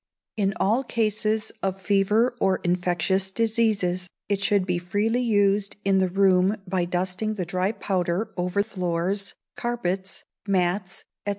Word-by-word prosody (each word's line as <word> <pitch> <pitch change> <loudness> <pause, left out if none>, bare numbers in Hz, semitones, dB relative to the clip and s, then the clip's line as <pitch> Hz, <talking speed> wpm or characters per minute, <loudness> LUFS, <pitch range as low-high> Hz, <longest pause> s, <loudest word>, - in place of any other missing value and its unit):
In 200 -2 0
all 225 +7 +2
cases 220 -2 0
of 195 0 -2
fever 205 +5 +2
or 190 -1 +2
infectious 180 +2 +1
diseases, 205 -4 0 0.2
it 200 -1 0
should 200 -1 +2
be 180 -2 0
freely 205 +7 0
used 205 -3 +2
in 195 -1 +4
the 185 -1 +2
room 190 +1 +3
by 180 -1 0
dusting 185 +4 -1
the 185 -4 -3
dry 185 +3 0
powder 190 0 -1
over 180 +3 0
floors, 185 0 -2 0.2
carpets, 190 -5 -3 0.2
mats, 185 0 0 0.2
&c. - - +2
195 Hz, 135 wpm, -25 LUFS, 180-210 Hz, 0.2 s, in